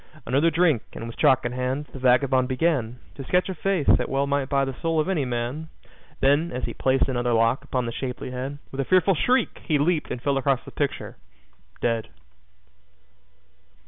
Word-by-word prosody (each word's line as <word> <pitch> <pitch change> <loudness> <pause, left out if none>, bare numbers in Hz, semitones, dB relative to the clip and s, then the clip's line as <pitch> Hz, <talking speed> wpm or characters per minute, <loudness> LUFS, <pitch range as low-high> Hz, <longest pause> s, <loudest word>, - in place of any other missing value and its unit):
Another 140 +6 +3
drink, 160 -7 +2
and 115 - -7
with 115 - -8
chalk 130 -1 +3
in 120 - -1
hand, 130 +3 -2
the 135 - -8
vagabond 130 0 +3
began 130 -3 0 0.2
To 135 - -8
sketch 180 +7 +1
a - - -2
face 185 -2 -1
that - - +3
well 135 +1 +1
might 140 -1 -1
buy 140 -1 +2
the 135 - -4
soul 165 -1 +1
of 155 - +1
any 170 -8 0
man. 125 +6 -3 0.5
Then, 145 +5 +3
as 125 0 -4
he - - -3
placed 130 0 +1
another 120 -2 0
lock 115 +4 +2
upon 130 -3 -2
the 115 - -3
shapely 125 +1 -5
head, 130 +3 -5
With 135 - -2
a - - -3
fearful 185 +3 +4
shriek, 250 - +1
he 155 - +1
leaped 155 +2 0
and - - -4
fell 140 +2 0
across 135 -2 +1
the - - -10
picture - - -3 0.6
dead. 115 -2 -1
135 Hz, 195 wpm, -24 LUFS, 125-155 Hz, 0.6 s, fearful